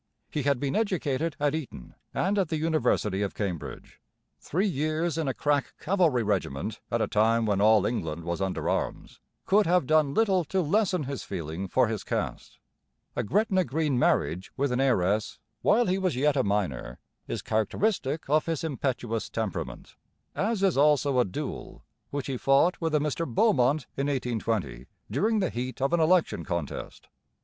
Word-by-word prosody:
He 150 - -1
had 140 -2 +1
been 140 0 -1
educated 165 -7 0
at 145 0 +1
Eton 145 - -6 0.2
and 200 +2 0
at 185 -5 0
the 160 - -1
university 150 - +1
of 100 - -2
Cambridge. 95 -6 -5 0.4
Three 185 +7 -1
years 155 -1 0
in 160 -3 -1
a 135 - 0
crack 145 -1 0
cavalry 165 - +2
regiment 95 -10 -2
at - - +1
a - - 0
time 115 +2 +2
when 100 -2 +1
all 105 -1 +5
England 85 -8 -2
was 85 +2 -3
under 95 -1 -2
arms - - -2 0.3
could 205 0 +4
have 180 -3 +3
done 155 -1 +3
little 195 -5 +3
to 190 - -1
lessen 180 0 +1
his 140 0 -4
feeling 85 0 -5
for 125 +6 +3
his 110 -2 -3
caste. - - -4 0.6
A - - 0
Gretna 195 - +2
Green 150 -4 0
marriage 90 -5 +1
with 140 -1 0
an 125 +1 +1
heiress, 105 -5 +1 0.2
while 235 +3 +4
he 185 +1 +1
was 185 -6 0
yet 145 +3 +2
a 130 - +2
minor, 95 -12 -2 0.3
is - - -4
characteristic 145 - 0
of 155 +3 +2
his 165 -2 -2
impetuous 125 -7 -2
temperament, 110 -4 -5 0.4
as 210 0 -1
is 185 -8 +3
also 145 -2 +4
a 125 - +4
duel 90 - -6 0.3
which 140 -2 -3
he 135 -2 -3
fought 135 +9 +3
with 160 -2 0
a - - +4
Mr 150 +3 -1
Beaumont 140 - +3
in 140 +1 -1
1820 115 - -2 0.2
during 215 - +1
the 185 - 0
heat 125 +3 -4
of 135 +5 0
an 170 - +3
election 170 +2 +2
contest. 85 -5 -5
140 Hz, 175 wpm, -27 LUFS, 110-165 Hz, 0.6 s, all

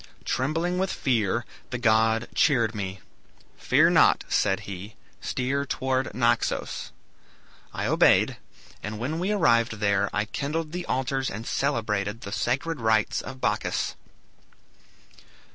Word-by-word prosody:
Trembling 165 +7 0
with 190 0 0
fear, 115 -3 0 0.2
the 125 - -3
god 110 -1 +3
cheered 120 -7 +3
me. 100 -3 -5 0.5
'Fear - - +3
not,' - - +5
said 95 -2 +1
he; 100 +2 -8 0.2
'steer 135 +2 -1
towards 130 -1 -1
Naxos.' 120 -1 0 0.8
I - - -3
obeyed, - - +4 0.4
and 105 0 -5
when 145 +9 -3
we 185 +4 0
arrived 120 - +3
there, 100 -2 +1
I 105 0 0
kindled 150 +6 -3
the 180 +1 -5
altars 130 +1 -1
and 110 +4 -6
celebrated 110 -6 -1
the 100 - -7
sacred 135 +8 -1
rites 110 -2 +2
of 130 0 -9
Bacchus." - - -1
120 Hz, 125 wpm, -26 LUFS, 110-140 Hz, 0.8 s, not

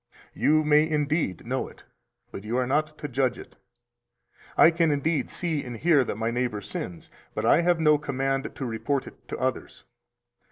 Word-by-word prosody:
You 155 +1 +3
may 150 +1 +4
indeed 150 - -1
know - - -2
it, - - -16 0.5
but 95 - -8
you 115 +4 -2
are 130 - +1
not 155 +4 0
to 150 - -5
judge 130 -1 0
it. - - -12 1.0
I 165 - +8
can 165 -1 +2
indeed 145 -1 0
see 160 -5 -2
and 120 -3 -7
hear 150 -1 +4
that 115 - -4
my 115 +1 -1
neighbor 120 -3 -1
sins, 90 -3 -7 0.2
but 110 - -2
I 145 - +5
have 175 -1 +2
no 150 -2 +4
command 135 -1 -1
to 135 - -4
report 125 +4 -2
it - - -14
to - - -5
others. 130 0 -3
140 Hz, 185 wpm, -26 LUFS, 125-155 Hz, 1.0 s, I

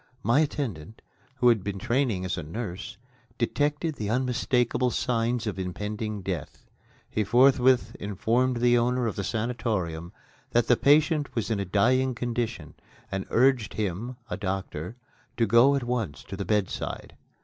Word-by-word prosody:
My 120 +5 +3
attendant, 115 - -3 0.3
who 125 -2 +4
had 110 -5 +3
had 100 0 -4
training 120 -4 0
as 90 - -1
a 90 - -4
nurse, 90 +3 -6 0.4
detected 150 +2 0
the 105 -2 -3
unmistakable 125 0 +1
signs 120 -1 0
of 105 -3 -3
impending 105 +3 -4
death. 90 -6 -5 0.4
He 110 - -1
forthwith 125 +3 +4
informed 115 +5 0
the 120 0 +5
owner 125 +1 +1
of 110 - -2
the 100 - -3
sanatorium 105 -8 -2 0.4
that 120 0 +4
the 125 - +4
patient 150 +2 +3
was 115 -1 -1
in 105 - 0
a 100 - -2
dying 125 +7 +2
condition, 120 -9 -3 0.4
and 95 0 -3
urged 125 -2 +2
him 110 +5 -3
(a - - -4
doctor) 95 -2 -4 0.4
to 115 - +3
go 120 +6 +5
at 135 - -1
once 115 - -3
to 95 - -7
the 100 0 -4
bedside. 105 -1 -2
115 Hz, 150 wpm, -27 LUFS, 100-125 Hz, 0.4 s, the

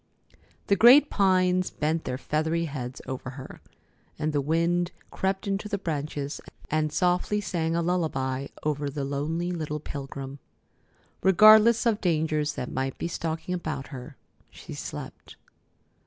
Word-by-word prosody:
The 200 - +3
great 250 +9 +7
pines 185 -2 +3
bent 160 +2 -1
their 125 - -2
feathery 160 +4 -1
heads 130 -4 -6
over 130 0 -5
her, 130 - -10 0.6
and 155 0 -1
the 145 - +2
wind 170 +4 +1 0.2
crept 190 0 -1
into 200 +2 -2
the 205 - -1
branches 150 -5 -4 0.3
and 155 0 +1
softly 180 +5 +1
sang 165 -4 -1
a 170 - +1
lullaby 140 -6 -1 0.2
over 150 -1 -1
the 140 0 -4
lonely 155 +5 -2
little 155 -3 -3
pilgrim. 140 -1 -7 0.8
Regardless 215 +5 +7
of 225 -3 +2
dangers 155 -4 +1
that 125 - -5
might 135 0 -2
be - - -3
stalking 165 +1 -3
about 155 -6 -4
her, 135 0 -9 0.3
she - - -10
slept. - - -8
160 Hz, 140 wpm, -27 LUFS, 145-180 Hz, 0.8 s, great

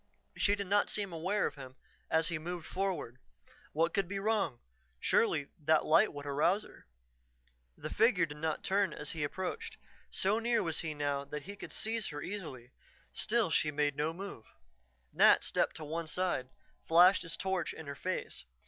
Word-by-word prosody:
She 205 - +2
did 200 -1 -4
not 205 +2 +2
seem 200 -4 -2
aware 185 +6 0
of - - -2
him 130 -2 -10 0.3
as 160 0 +2
he 170 -2 -2
moved 175 +1 -5
forward. 180 -11 -3 0.5
What 165 +2 +1
could 195 -3 +1
be 200 +2 -3
wrong; 195 - 0 0.4
surely 150 - +2
that 155 +1 +3
light 165 +7 +5
would 145 0 -8
arouse 155 +9 +2
her. - - -16 0.9
The - - -6
figure 215 -6 +4
did 145 -1 -9
not 155 0 -2
turn 195 -3 +1
as 150 - -4
he 160 -3 -3
approached. 190 - -4 0.3
So 200 +4 +1
near 230 -1 +1
was 165 -3 -1
he 155 -2 -3
now 145 -1 -1
that 150 +1 -6
he 200 +2 -8
could - - -9
seize 225 -1 -1
her 145 -2 -6
easily, 145 -11 -6 0.4
still 225 -6 +1
she 155 - +3
made 145 -1 0
no 150 +2 0
move. 175 - -8 0.7
Nat - - +6
stepped - - +1
to 160 - -6
one 160 +2 -4
side, 155 -6 -1 0.4
flashed 175 +4 +7
his 165 -1 -4
torch 190 -3 -1
in 160 - -9
her 140 - -5
face. 185 - -4
165 Hz, 180 wpm, -33 LUFS, 150-195 Hz, 0.9 s, flashed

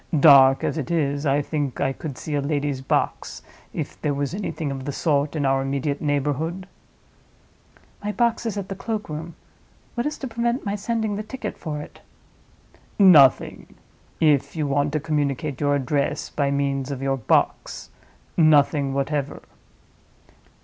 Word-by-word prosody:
Dark 135 -3 +7
as 160 - -1
it 140 - -4
is, 145 -3 0
I 140 +1 +2
think 145 -3 -3
I 135 - 0
could 140 -2 -7
see 155 - -6
a 145 - +1
lady's 145 -2 -2
box, 135 - -2 0.3
if - - -6
there 145 -2 0
was 140 +2 -2
anything 165 -7 -3
of 135 -1 -6
the 145 - -2
sort 145 0 0
in 145 -2 0
our 135 0 +2
immediate 140 +1 -2
neighborhood." 150 +5 -1 1.4
"My 210 - -1
box 235 +1 0
is 210 - -3
at 195 -2 -4
the 195 - -4
cloak 215 0 -4
room. 155 +2 -6 0.6
What 240 +3 -1
is 300 - -4
to 270 - -5
prevent 235 +2 -1
my 200 - -1
sending 220 0 -2
the - - -2
ticket 260 +5 -6
for 150 -3 -5
it?" - - -14 1.0
"Nothing—if 150 -3 +3
you 155 -2 -1
want 145 +1 0
to 155 - +1
communicate 145 -2 -2
your 145 0 +2
address 140 +1 -1
by 140 -1 0
means 140 -1 -1
of 135 -1 -5
your 135 0 0
box—nothing 145 +3 0
whatever. 140 0 -2
145 Hz, 155 wpm, -23 LUFS, 140-170 Hz, 1.4 s, Dark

